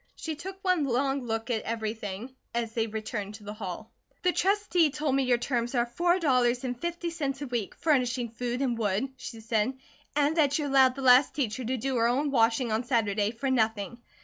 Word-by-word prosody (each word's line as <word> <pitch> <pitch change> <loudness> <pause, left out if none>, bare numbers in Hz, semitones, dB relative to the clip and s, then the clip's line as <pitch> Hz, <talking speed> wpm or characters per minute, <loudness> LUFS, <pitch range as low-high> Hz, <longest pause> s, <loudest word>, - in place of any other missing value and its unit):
She 320 -1 -4
took 380 +5 -8
one 365 -5 +2
long 270 +1 0
look 225 +1 -2
at 220 -2 0
everything 220 +1 -4 0.2
as 230 -1 -1
they 225 -1 0
returned 210 -1 -4
to 215 - -13
the 205 +1 -6
hall. 210 0 -7 0.3
"The 360 - +4
Trustee 380 -4 +2
told 295 -1 -1
me 275 - +3
your 250 -1 +3
terms 240 0 -1
are 240 -1 +3
four 345 +9 +1
dollars 255 -7 +2
and 250 -1 -2
fifty 345 0 -3
cents 285 -4 -3
a - - -3
week, 240 -6 -3
furnishing 250 -6 +1
food 245 +2 -2
and 245 -3 0
wood," 215 +3 0
she 230 -3 -8
said, 225 +3 0 0.4
"and 295 +2 +2
that 285 -3 +3
you 300 - -1
allowed 265 -2 +5
the 270 - -5
last 255 +2 +6
teacher 255 -3 -1
to 255 +3 -1
do 260 +2 -1
her 230 0 +3
own 275 +4 +1
washing 230 -1 +2
on 220 +3 0
Saturday, 215 -4 +1
for 260 +4 -2
nothing. 220 -2 0
250 Hz, 205 wpm, -28 LUFS, 225-280 Hz, 0.4 s, last